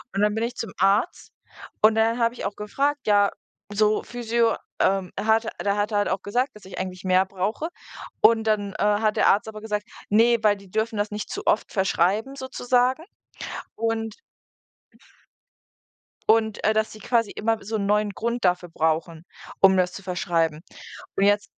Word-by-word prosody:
Und 200 - +1
dann 210 0 +2
bin 220 - -1
ich 240 +1 -3
zum 225 -5 -5
Arzt 195 - +1 0.5
und 215 +1 +6
dann 225 +2 +2
habe 230 0 +2
ich - - -7
auch 200 +1 -3
gefragt: 280 +7 -1
„Ja, 205 -1 +4 0.4
so 215 +1 +2
Physio 235 -1 0 0.2
ähm, 190 -1 +1
er - - -4
hat 220 0 +3 0.2
der 200 0 +1
hatte 210 +1 -1
halt 205 - +1
auch 190 0 -1
gesagt, 245 +7 0
dass 210 - -14
ich 190 - -10
eigentlich 185 -1 -5
mehr 185 0 +4
brauche.” 200 - -3 0.5
Und 225 -1 +5
dann, 205 -2 0
äh, - - -2
hat 210 +1 +2
der - - +4
Arzt 200 +2 +2
aber 215 -1 -9
gesagt: 210 -1 -3 0.2
„Ne“, 230 +3 +5
weil 205 -1 +4
die 195 -1 -16
dürfen 220 +1 -1
das 205 +1 -1
nicht 210 0 -5
zu - - -5
oft - - +1
verschreiben, 195 +6 +1
sozusagen 255 +1 0 0.7
und 225 -1 -2 2.1
und, 220 -1 +2
äh, 215 - +3
dass 220 0 +1
sie 215 - -11
quasi 230 0 0
immer 225 +1 0
so 220 +2 -3
'n 200 -1 -2
neuen 210 0 +2
Grund 235 +2 -2
dafür 180 0 +1
brauchen, 160 +1 -1 0.4
um 190 -1 +7
das 180 0 +1
zu 195 - -9
verschreiben. 170 -4 -1 0.5
Und 195 - +1
jetzt 205 0 +3
210 Hz, 180 wpm, -24 LUFS, 195-225 Hz, 2.1 s, um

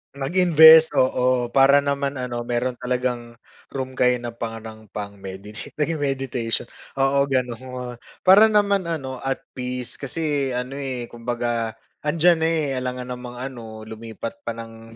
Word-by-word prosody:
Mag-invest, 160 +1 +7
oo 125 -1 +2
para 140 +1 +5
naman 140 0 -1
ano 125 -2 -4
mayro'n 120 +1 -1
talagang 125 -1 -2 0.4
room 130 -1 -3
kayo 125 -1 +3
na 120 - -4
parang 110 -1 -7
pang 100 0 -7
meditate, 95 +2 -8
naging 155 +1 -1
meditation, 135 -4 -1 0.3
oo, 140 +1 +2
gano'n. 125 -1 -3 0.3
Para 200 +4 +8
naman 200 -4 +2
ano, 135 -6 -4
at 135 +1 -3
peace 125 -1 -3
kasi 140 -2 -1
ano, 125 +3 -4
eh, 130 -3 -4
kumbaga 120 -1 -2 0.3
andiyan 165 +2 +4
na, 160 - +2
eh, 150 -5 0
alangan 125 0 -4
namang 125 0 -8
ano 120 -4 -7
lumipat 115 +1 -8
pa 115 - -2
ng 115 0 -11
125 Hz, 140 wpm, -23 LUFS, 120-140 Hz, 0.4 s, Para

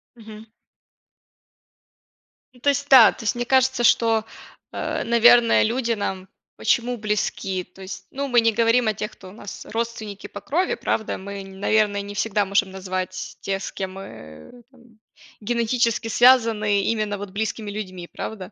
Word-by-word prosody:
Мгм. 220 -1 -12 2.1
Ну, 250 - -20
то 285 - +1
есть 280 0 -1
да, 260 -5 +9
то - - -11
есть 215 - 0
мне 240 0 -2
кажется, 260 0 +2
что, 225 -2 +3 0.5
э, - - -3
наверное, 235 0 +5
люди 235 +1 -1
нам 190 -4 -3 0.3
почему 245 +1 0
близки? 205 -3 -2
То 180 +2 -18
есть, 190 +1 -8
ну, 280 +1 -3
мы 245 -3 +4
не 225 0 +3
говорим 230 +2 +2
о 215 - +2
тех, 210 +1 -5
кто 190 - -14
у - - -13
нас 205 0 -10
родственники 225 -3 -5
по 205 - -9
крови, 335 - 0
правда? 220 - -2
Мы, 200 +1 -7
наверное, 200 +1 0
не 200 0 -8
всегда 205 -1 0
можем 195 0 +1
назвать 185 -1 -5
тех, 195 0 -3
с - - -5
кем 190 -1 -5
мы 80 - -12
там 240 -4 -22 0.4
генетически 235 +1 0
связаны, 225 -4 +4
именно 215 -2 -1
вот 205 0 -7
близкими 215 +1 -4
людьми, 185 -4 -6
правда? 195 -3 -7
215 Hz, 160 wpm, -23 LUFS, 195-235 Hz, 2.1 s, да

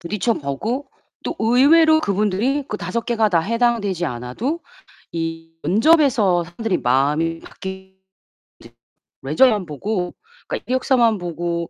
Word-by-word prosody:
부딪혀 210 +5 -1
보고 220 - -3 0.4
또 - - -3
의외로 315 +8 +5
그분들이 215 +6 0
그 210 - -3
5 185 +5 -3
개가 225 -3 +2
다 170 -4 +2
해당되지 225 -3 0
않아도 125 - -4 0.5
이 165 0 -5
면접에서 220 - +3
사람들이 185 +4 -2
마음이 150 +6 +1
바뀔 190 0 -9 1.3
네. 135 - -6
레저만 210 +2 +4
보고 180 +4 -3 0.3
그러니까 - - -5
이력서만 250 -4 +2
보고 170 -1 -3
195 Hz, 275 characters per minute, -20 LUFS, 170-240 Hz, 1.3 s, 의외로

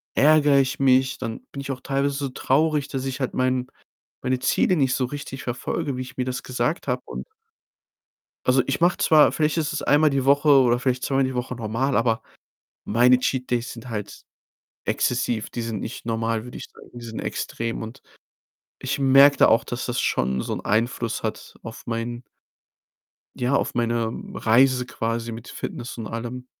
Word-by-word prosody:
ärgere 145 -1 +5
ich 130 0 0
mich, 130 0 +3
dann 115 - -5
bin 140 - -6
ich 135 - -7
auch 130 -1 -6
teilweise 140 +1 0
so 140 -1 -2
traurig, 145 +2 +1
dass 135 -1 -4
ich 135 +1 -4
halt 130 - -2
mein 130 0 +1 0.5
meine 130 0 0
Ziele 180 +7 +2
nicht 135 -4 +2
so 130 - 0
richtig 135 -1 -7
verfolge, 130 +3 -3
wie 130 - -4
ich 130 - -9
mir 125 - -1
das 125 -1 -4
gesagt 125 +6 -2
habe - - 0
und - - -7 1.2
also, 130 +1 +4
ich 135 +4 -1
mache 175 +1 +4
zwar 155 -2 +5
vielleicht 155 0 0
ist 150 -2 0
es 150 - -3
einmal 150 +1 +4
die 135 -1 0
Woche 145 +2 +4
oder 125 -4 +6
vielleicht 125 0 -1
zweimal 135 0 +1
die 130 0 -1
Woche 125 0 -3
normal, 120 +5 -1
aber 115 -1 +2 0.6
meine 125 +3 +4
Cheat 130 0 -2
Days 120 0 -1
sind 115 +1 -10
halt 105 -3 -6 0.6
exzessiv. 120 -2 0
Die 120 - -5
sind 115 -3 -3
nicht 115 - -7
normal, 115 0 -1
würde 125 - -9
ich - - -7
sagen. - - -16
Die 120 - -10
sind 110 -1 -6
extrem. 115 0 -4
Und 115 +5 -9 0.8
ich 135 +2 -3
merke 135 +1 +7
da - - +6
auch, 115 - +4
dass 120 +1 -4
das 120 0 -1
schon 65 0 0
so - - -4
'n - - -5
Einfluss 115 +1 0
hat 110 - -5
auf 115 0 -9
mein 120 +1 -3 1.1
ja, 125 +3 0
auf - - 0
meine 115 -1 0 0.2
Reise 125 +2 +3
quasi 115 -1 -3
mit 115 +1 -8
Fitness 120 0 -6
und 110 - -5
allem. 120 +2 -6
125 Hz, 185 wpm, -24 LUFS, 115-135 Hz, 1.2 s, merke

